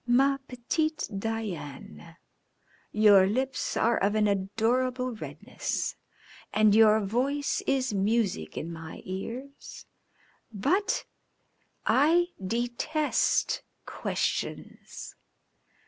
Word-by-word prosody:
"Ma 275 +3 +4
petite 310 +6 -1
Diane, 175 - -5 0.7
your 205 -3 +6
lips 260 +6 -1
are 235 +1 +3
of 205 +2 +1
an 215 -1 +3
adorable 240 +6 0
redness 220 - -4 0.6
and 215 -1 +4
your 215 0 +6
voice 265 +8 0
is 260 -4 +1
music 200 - 0
in 170 +1 -4
my 160 -1 -9
ears, 240 +9 -7 0.7
but 355 - 0 0.8
I 335 +6 +4
detest 240 +8 0 0.2
questions. - - -4
225 Hz, 85 wpm, -28 LUFS, 200-265 Hz, 0.8 s, your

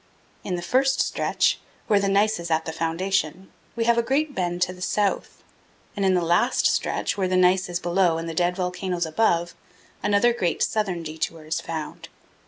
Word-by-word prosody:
In 185 - -2
the 175 - -5
first 265 +7 +2
stretch, - - +1 0.3
where 210 -3 +3
the 200 0 0
gneiss 205 +1 +2
is 170 0 -6
at 160 0 +1
the 160 - -3
foundation, 170 +2 -2 0.2
we 230 - 0
have 235 0 +3
a - - +4
great 280 +5 0
bend 175 -4 -1
to 180 - -2
the 180 - -14
south, 200 +2 -1 0.5
and 200 - -2
in 190 -1 +3
the 180 - +1
last 175 +9 +2
stretch, - - 0
where 190 - +1
the 185 0 +1
gneiss 185 +1 +3
is 175 0 -2
below 175 -1 +2
and 165 0 -4
the 165 - -4
dead 175 +1 +1
volcanoes 180 -1 -2
above, 170 0 +1 0.5
another 205 +4 +3
great 180 -8 0
southern 190 -6 -1
detour 160 0 -4
is 155 - -2
found. 160 -2 -6
180 Hz, 190 wpm, -24 LUFS, 170-200 Hz, 0.5 s, a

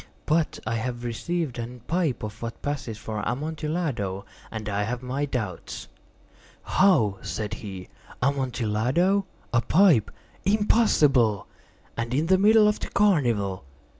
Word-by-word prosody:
But 155 +1 +1
I 115 +1 -1
have 120 +1 -4
received 130 +3 -2
a 115 - -3 0.2
pipe 165 -10 0
of 110 +1 -6
what 115 -1 -6
passes 140 -6 -3
for 110 -1 -5
Amontillado, 140 - -2 0.2
and 110 -2 -6
I 100 0 -1
have 120 +4 -3
my 135 +3 -1
doubts." 110 - -5 0.7
"How?" 115 - +3
said 105 +2 -4
he. 95 -4 -7 0.3
"Amontillado? 135 - +1 0.3
A 115 - +4
pipe? 160 - +4 0.3
Impossible! 150 - +3 0.5
And 115 +1 -2
in 150 +4 +2
the 185 +2 +4
middle 215 +1 +6
of 210 - +1
the - - -4
carnival!" 120 - +2
125 Hz, 130 wpm, -26 LUFS, 110-165 Hz, 0.7 s, middle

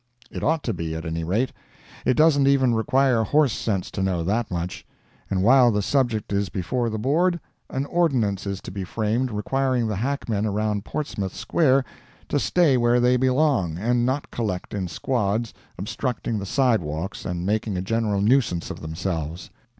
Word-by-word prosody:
It - - -6
ought 160 0 +1
to 115 - -1
be, 80 -2 -4
at 80 +1 -5
any 80 0 -3
rate. 105 +10 0 0.5
It 130 - +4
doesn't 150 -3 +4
even 130 -3 +4
require 130 +1 +2
horse 145 +2 +3
sense 100 -5 -2
to 95 - -3
know 95 -3 0
that 105 +6 0
much. 90 0 -4 0.5
And 95 -1 0
while 125 +2 +6
the 105 -2 0
subject 120 -5 0
is 100 -1 0
before 115 +6 -1
the 110 - -3
Board, 170 +10 +1 0.3
an 135 +1 -2
ordinance 125 - +1
is 100 -1 -3
to - - -8
be 95 0 -4
framed 110 +6 -1
requiring 130 +3 0
the 105 -3 -2
hackmen 115 -3 -1
around 105 0 -1
Portsmouth 105 -11 -4
Square 135 - +2 0.4
to 145 - +1
stay 155 -4 +3
where 120 0 +3
they 125 +1 +4
belong, 130 - +2
and 120 +5 +1
not 130 +4 -1
collect 105 -6 -3
in 95 -3 -2
squads, 110 +3 -1 0.2
obstructing 110 +3 -3
the 100 - -5
sidewalks, 95 - 0
and 90 0 -3
making 105 -1 -1
a - - -1
general 105 -1 0
nuisance 105 -6 +2
of - - -8
themselves. 80 0 -4
110 Hz, 175 wpm, -24 LUFS, 95-130 Hz, 0.5 s, while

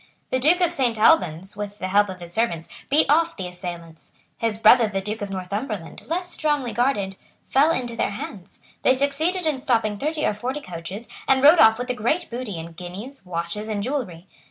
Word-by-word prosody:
The 255 - +1
Duke 325 +7 +3
of 350 -2 +3
Saint 250 -8 0
Albans, 195 - +3
with 205 0 -6
the 185 - -3
help 205 +1 +4
of 185 -1 -8
his 175 0 -9
servants, 170 -8 0 0.2
beat 295 +3 +4
off 330 +3 +3
the 185 -3 -4
assailants. 175 -2 -8 0.3
His 225 -2 0
brother 225 +1 +6
the 195 -2 -2
Duke 210 +3 -5
of 205 - -3
Northumberland, 195 0 -5
less 355 +2 -2
strongly 295 -6 0
guarded, 205 -7 0 0.3
fell 280 +4 +4
into 245 -7 -1
their 230 - 0
hands. 200 -2 -8 0.2
They 260 - +4
succeeded 310 +7 0
in 300 -4 0
stopping 225 -6 +1
thirty 305 +1 -1
or - - +2
forty 250 +7 -3
coaches, 185 - -7 0.2
and 265 0 +3
rode 310 +4 +8
off 220 0 +7
with 250 +1 -2
a - - -1
great 245 +10 -1
booty 235 -6 -4
in 165 +1 -7
guineas, 190 +7 -9
watches 170 +5 -4
and 210 -2 -2
jewellery. 215 - -3
220 Hz, 200 wpm, -23 LUFS, 190-275 Hz, 0.3 s, rode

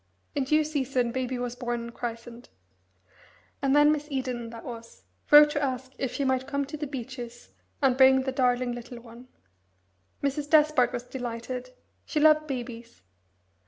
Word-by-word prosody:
In 280 -3 -1
due 305 +3 +3
season 265 -5 -1
Baby 255 0 -2
was 245 0 -4
born 240 -1 -3
and 235 0 -8
christened; 235 0 -7 1.1
and 275 0 +2
then 295 0 +6
Miss 300 -1 -2
Eden, 255 -4 -3
that 230 0 -10
was, 230 -1 -9 0.3
wrote 295 0 +9
to 290 - -1
ask 260 -2 -3
if 265 -3 -2
she 280 - -2
might 260 0 0
come 280 0 -1
to 290 +3 -7
the 300 -1 -4
Beeches, 245 -3 -8 0.3
and 260 -2 +4
bring 265 0 +6
the 265 - -2
darling 250 -2 +1
little 240 0 -8
one. 235 +1 -14 1.0
Mrs. 285 +1 -1
Despard 305 -5 +4
was 245 - -4
delighted. 245 0 -6 0.3
She 305 - -2
loved 310 0 +5
babies. 240 - -7
255 Hz, 160 wpm, -27 LUFS, 240-280 Hz, 1.1 s, wrote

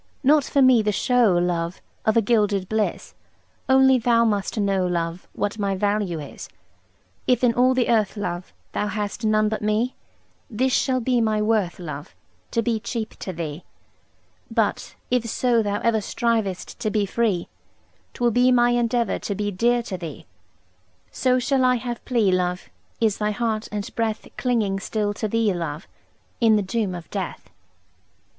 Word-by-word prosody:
Not 290 +2 +5
for 280 - +3
me 255 -3 +6
the 210 0 +1
show, 230 -3 +3
love, 175 0 -1 0.3
Of 220 - +4
a 230 - +4
gilded 205 -4 +1
bliss; 220 0 -2 0.6
Only 265 -1 +6
thou 235 -1 +3
must 205 0 -1
know, 195 -2 +1
love, 170 0 -3
What 205 +1 -2
my 200 -1 0
value 200 -3 0
is. 145 -2 -9 0.8
If 250 -1 +2
in 240 -2 +4
all 255 +2 +3
the 250 -2 +2
earth, 220 -3 +1
love, 180 -3 -4 0.2
Thou 210 - -1
hast 210 +2 -4
none 215 0 +3
but 215 0 -2
me, 215 +4 0 0.6
This 255 +3 0
shall 255 -2 +2
be 245 0 +1
my 215 -1 +1
worth, 210 -4 +1
love: 150 -4 -8 0.3
To 230 - 0
be 230 -1 0
cheap 225 0 -4
to 185 - -4
thee. 160 -2 -5 0.9
But, - - -1 0.2
if 250 -2 +2
so 235 0 +2
thou 205 -1 -1
ever 230 -2 +2
Strivest 215 -4 -2
to 215 - -1
be 210 -1 +1
free, 200 -3 0 0.7
'Twill 240 -1 +2
be 250 +3 +4
my 240 -1 +4
endeavour 240 0 +1
To 200 - -3
be 205 +1 -2
dear 235 +5 +2
to 190 -5 -5
thee. 165 -4 -8 0.9
So 255 -1 +2
shall 260 +1 +1
I 250 0 +4
have 240 0 -5
plea, 230 -7 +2
love, 180 0 -1 0.3
Is 220 -3 +1
thy 210 0 +1
heart 220 0 -2
andbreath 215 +1 -3
Clinging 220 -6 0
still 205 +1 -2
to 215 +1 -3
thee, 225 -1 +1
love, 165 -2 -5 0.5
In 225 -2 +5
the 210 - +2
doom 200 -2 -2
of 175 -2 -8
death. 185 - -5
215 Hz, 165 wpm, -23 LUFS, 195-240 Hz, 0.9 s, me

